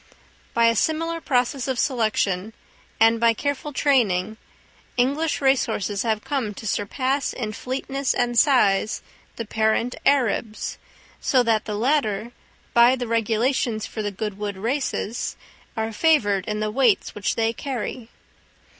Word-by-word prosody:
By 235 0 +4
a 230 0 +4
similar 330 +6 0
process 255 -1 0
of 260 -2 -1
selection, 220 -6 0 0.5
and 225 +1 +5
by 230 0 +4
careful 285 +3 -3
training, 220 -8 +1 0.6
English 285 +6 +1
race 270 -1 +3
horses 205 -2 -2
have 220 -2 -1
come 250 -8 -2
to 220 - -9
surpass 255 +7 -1
in 215 -4 -4
fleetness 270 +3 -2
and 240 0 0
size 220 -6 +3 0.3
the 230 - -5
parent 220 +3 +1
Arabs, 235 -5 0 0.4
so 255 -2 +3
that 225 -2 +1
the 210 - -3
latter, 235 -2 0 0.4
by 240 +2 +6
the 250 -1 -4
regulations 230 0 0
for 220 - -5
the 205 - -1
Goodwood 205 0 -4
Races, 235 0 -2 0.4
are 220 0 -2
favoured 210 - +2
in 210 -1 -2
the 215 0 -1
weights 240 -3 +2
which 205 -1 -2
they 225 0 +1
carry. 240 -2 -5
230 Hz, 135 wpm, -23 LUFS, 215-265 Hz, 0.6 s, by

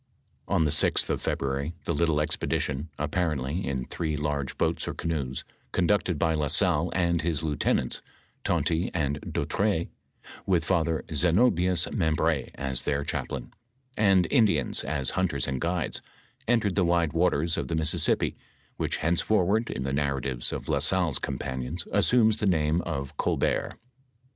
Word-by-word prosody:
On 80 - +2
the 75 - +1
6th - - +2
of - - -1
February, 70 +3 -2
the 85 - 0
little 80 -1 +2
expedition, 75 0 -1
apparently 75 0 -1
in 65 -2 -2
three 80 -3 -3
large 70 -2 -2
boats - - 0
or - - -3
canoes, 70 -6 -3 0.3
conducted 90 -2 +1
by 80 +2 +2
La 75 -2 0
Salle - - +2
and 85 -2 +2
his 80 -1 -1
lieutenants, 75 -4 0 0.4
Tonty 85 +1 +1
and 75 -3 0
Dautray, 100 -5 -1 0.6
with 85 -4 +2
Father 80 -3 +1
Zenobias 90 - +3
Membr6, 80 - 0
as 70 -1 -2
their 70 +1 -1
chaplain, - - -4 0.4
and 95 -4 +4
Indians 95 - +3
as 70 -4 -1
hunters 85 -8 0
and 65 -2 -2
guides, 85 0 -1 0.5
entered 110 -5 +2
the 95 - +2
wide 85 -3 +2
waters 85 -1 +2
of - - -3
the 80 - -1
Mississippi, 80 -1 +2 0.4
which - - -1
henceforward, 100 +5 +2
in 65 - -3
the 65 0 -2
narratives 70 -3 -1
of - - -5
La - - +1
Salle's 90 -6 +1
companions 65 +4 -4
assumes 110 +3 +4
the 105 - 0
name 80 -2 +2
of 70 -3 -4
Oolbert. - - 0
80 Hz, 145 wpm, -27 LUFS, 70-90 Hz, 0.6 s, and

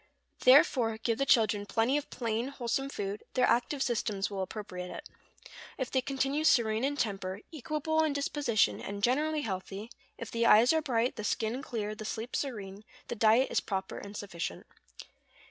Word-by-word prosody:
Therefore 255 -4 +5
give 225 0 -1
the 275 - +1
children 210 -3 +3
plenty 230 +5 +1
of 295 - -2
plain, 230 0 -2
wholesome 270 0 -2
food; 205 -4 -4
their 255 - +4
active 265 +3 +1
systems 215 -4 -1
will 195 -1 -3
appropriate 185 -2 -6
it. - - -8 0.7
If 260 -3 -3
they 260 - +2
continue 275 +3 -1
serene 225 -6 +3
in 285 +1 0
temper, 195 -4 -2
equable 315 +2 0
in 310 - +1
disposition, 280 -5 +1
and 200 0 -6
generally 300 +6 +2
healthy, 195 0 -5 0.3
if 230 - -7
the 230 0 +1
eyes 230 +7 +7
are 320 - +2
bright, 245 -4 0
the 215 - -4
skin 225 +4 -1
clear, 215 -5 -4
the 215 - -8
sleep 225 +3 -4
serene, 205 -7 -4 0.3
the - - -2
diet 225 +4 +4
is - - +3
proper 190 -2 -4
and 205 +1 -8
sufficient. 170 - -5
230 Hz, 170 wpm, -30 LUFS, 205-270 Hz, 0.7 s, eyes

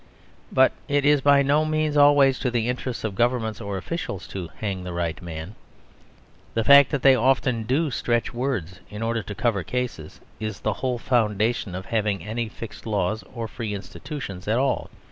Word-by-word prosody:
But 130 0 +5 0.2
it 145 0 +1
is 145 -1 +5
by 140 0 +5
no 145 +3 +3
means 155 -1 0
always 145 -2 +5
to 125 - 0
the 120 -1 0
interests 125 0 -3
of 110 -3 -2
governments 115 -1 0
or 100 -1 -4
officials 100 - -5
to 95 -3 -5
hang 95 -4 -3
the 90 -1 -5
right 85 -1 -2
man. 85 +2 -7 1.0
The 115 - +2
fact 140 +2 +8
that 145 -4 -2
they 135 - +8
often 125 -2 +2
do 145 +5 +1
stretch 120 -1 0
words 120 - -3
in 105 +2 -6
order 115 0 0
to 100 - -7
cover 110 -4 0
cases 125 -11 -4 0.2
is 110 -2 -5
the 110 - 0
whole 125 -2 0
foundation 110 -4 0
of 95 +1 -6
having 105 -3 -1
any 115 +1 -3
fixed 115 +1 -9
laws 105 -1 -1
or 115 -2 -4
free 110 -1 -4
institutions 100 -2 -7
at 110 +2 +2
all. 135 +1 0
115 Hz, 185 wpm, -24 LUFS, 100-135 Hz, 1.0 s, fact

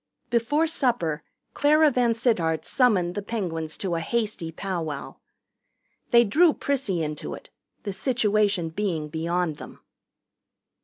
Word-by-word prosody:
Before 245 +7 +2
supper 240 - 0 0.3
Clara 300 +1 +4
VanSittart 230 - +1
summoned 200 -9 +2
the 205 - -3
Penguins 170 -8 -4
to 190 -3 -3
a 165 - 0
hasty 210 -3 -2
powwow. 165 -5 -4 0.9
They 235 -1 +6
drew 310 - +4
Prissy 230 -12 -1
into 150 -1 -4
it, - - -14 0.3
the 200 - -4
situation 210 -7 +1
being 165 -4 -2
beyond 165 0 -1
them. - - -11
200 Hz, 115 wpm, -25 LUFS, 165-240 Hz, 0.9 s, They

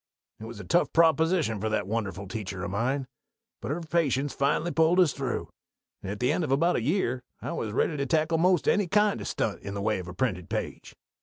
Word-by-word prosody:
_ - - -7
It - - -6
was 115 -2 -9
a - - -7
tough 170 - +2
proposition 160 - +3
for 110 - 0
that 105 -2 0
wonderful 100 -2 -3
teacher 95 -2 -5
of 85 - -3
mine; 130 +7 0 0.6
but 115 - -5
her 155 +5 -2
patience 145 -4 0
finally 145 +5 +1
pulled 165 +3 +3
us 175 -7 +4
through, 135 -3 -3 0.5
and 95 - -5
at 105 - -5
the 125 +3 +2
end 165 - 0
of 145 - -2
about 165 +6 +3
a - - 0
year 130 - 0 0.2
I - - -5
was 110 - -3
ready 150 +7 +1
to 140 - -1
tackle 160 0 +1
'most 180 0 +3
any 205 -3 +3
kind 210 +2 +2
of - - -5
stunt - - -2
in 100 0 -6
the - - -3
way 105 -2 +1
of 90 - -7
a 90 - -7
printed 90 -7 -2
page. - - -5
135 Hz, 235 wpm, -27 LUFS, 105-165 Hz, 0.6 s, us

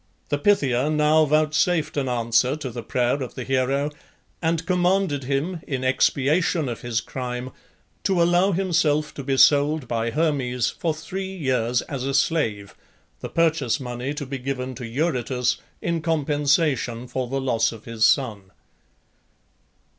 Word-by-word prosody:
The 145 - 0
Pythia 145 -8 +2
now 155 +1 +4
vouchsafed 155 +2 +1
an 135 -3 -1
answer 120 +2 +2
to 145 -5 -6
the 120 +1 -6
prayer 125 +4 0
of 125 - -6
the 130 - -4
hero, 135 +3 0 0.5
and 165 -1 0
commanded 180 -5 +1
him, 150 +6 -2
in 130 -3 -3
expiation 140 +5 +2
of 120 -2 -5
his 120 -2 -1
crime, 125 0 -5 0.5
to 190 -3 +2
allow 175 +3 +4
himself 165 -5 +1
to 140 - -7
be 135 0 0
sold 145 0 +4
by 115 0 -1
Hermes 130 -5 0
for 160 -3 -2
three 190 +4 -5
years 125 -8 0
as 135 -3 -5
a 135 0 -1
slave, 115 -10 0 0.5
the - - -6
purchase 160 -6 +1
money 125 +2 -4
to 145 -1 -4
be 135 0 -5
given 130 0 -4
to 125 -1 -7
Eurytus 125 -2 0 0.3
in 170 -1 -1
compensation 145 -5 0
for 125 +1 -3
the 135 +2 -2
loss 115 -4 +1
of 115 -2 -12
his 115 -1 -3
son. 105 -9 +2
140 Hz, 150 wpm, -23 LUFS, 125-155 Hz, 0.5 s, now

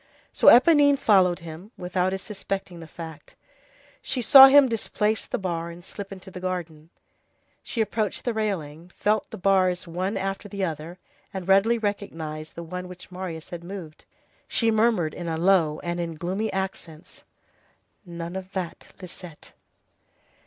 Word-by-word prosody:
So - - +1
Éponine 285 +2 +7
followed 185 -7 +4
him, 170 +4 -10
without 180 0 -1
his 190 0 -4
suspecting 195 -3 -5
the 165 - -10
fact. 160 -1 -10 0.7
She 260 - -2
saw 265 +3 +10
him 280 0 +7
displace 220 -2 -1
the - - -2
bar 170 -5 -3
and 170 +1 -11
slip 200 0 -8
into 190 0 -10
the 185 - -8
garden. 170 -4 -5 0.7
She 230 - -2
approached 215 -1 -2
the 240 - 0
railing, 175 -7 -3
felt 210 0 +1
of - - -45
the - - -8
bars 185 -2 +2
one 185 +5 -2
after 195 +2 -4
the 200 -1 -2
other, 165 +1 -6 0.3
and 190 -3 -6
readily 195 +5 +4
recognized 165 -8 -4
the 170 - -6
one 180 +2 -6
which 180 0 -12
Marius 180 -3 -7
had 170 -1 -7
moved. 175 -4 -9 0.4
She 230 -1 +2
murmured 215 -8 +2
in 175 - -6
a 160 -1 -2
low 170 -3 +3
voice - - -10
and 175 0 -3
in 165 -1 -3
gloomy 185 +7 -2
accents:— 185 -3 -6 0.8
"None 170 -1 -7
of 190 0 -7
that, 185 -3 -6
Lisette!" 175 -3 -11
185 Hz, 160 wpm, -25 LUFS, 170-205 Hz, 0.8 s, saw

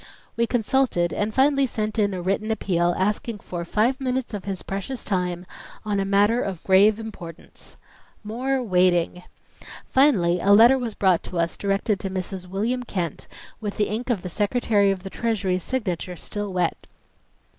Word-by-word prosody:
We 235 0 +1
consulted, 225 -8 +1
and 210 +1 -1
finally 275 +3 +3
sent 215 -1 -3
in 205 -1 +2
a 185 -2 -4
written 200 +4 -1
appeal, 175 -5 +1
asking 210 +3 -1
for 175 -3 -6
"five 235 +10 0
minutes 255 -2 -2
of 200 -3 -5
his 195 -2 -4
precious 200 +7 -5
time 180 -2 -2 0.4
on 205 -2 0
a 195 - 0
matter 205 +4 +3
of 190 -4 -4
grave 200 +3 +5
importance." 185 -7 -9 0.5
More 255 +5 -1
waiting! 180 -3 +2 0.7
Finally 190 -11 +3
a 200 +3 +4
letter 235 +5 +7
was 235 -4 -4
brought 185 -4 +3
to 180 - -6
us 170 0 0
directed 200 +1 0
to 195 - -4
Mrs. 185 0 -5
William 220 +7 -1
Kent, 180 -9 -4 0.3
with 210 -3 -5
the 210 - +1
ink 230 +5 -4
of 215 -7 0
the 180 - -4
Secretary 205 +1 +2
of 190 -2 -2
the 195 - -7
Treasury's 195 -6 -1
signature 185 -7 -3
still 205 +4 -5
wet. 180 -2 -1
200 Hz, 165 wpm, -24 LUFS, 185-230 Hz, 0.7 s, letter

